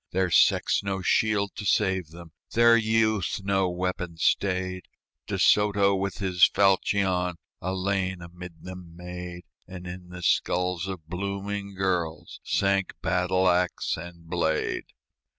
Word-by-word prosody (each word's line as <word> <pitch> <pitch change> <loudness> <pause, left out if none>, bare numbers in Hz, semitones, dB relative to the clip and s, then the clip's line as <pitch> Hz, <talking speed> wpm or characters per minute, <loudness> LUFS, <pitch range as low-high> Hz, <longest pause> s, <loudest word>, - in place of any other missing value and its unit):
Their 95 -1 0
sex - - +4
no 95 -1 -3
shield 100 0 +2
to - - -5
save 95 -3 +1
them, 85 +1 -12 0.2
Their 115 0 +6
youth 110 -4 +1
no 95 -1 +1
weapon 90 -1 -3
stayed; 95 0 0 0.4
De - - -2
Soto 100 -1 +4
with 95 0 -2
his 90 -3 0
falchion 95 -1 +3 0.3
A 95 +1 -2
lane 95 -1 -1
amid 85 0 -11
them 90 -2 -10
made, 90 0 -8 0.2
And 90 -1 -9
in 90 0 -8
the 90 0 -9
skulls 90 0 +1
of 95 -5 -6
blooming 100 +2 -4
girls 90 -5 -2
Sank 100 -1 +1
battle 95 +1 +1
axe 90 0 +1
and 85 0 -10
blade. 80 -2 -1
95 Hz, 135 wpm, -26 LUFS, 90-100 Hz, 0.4 s, Their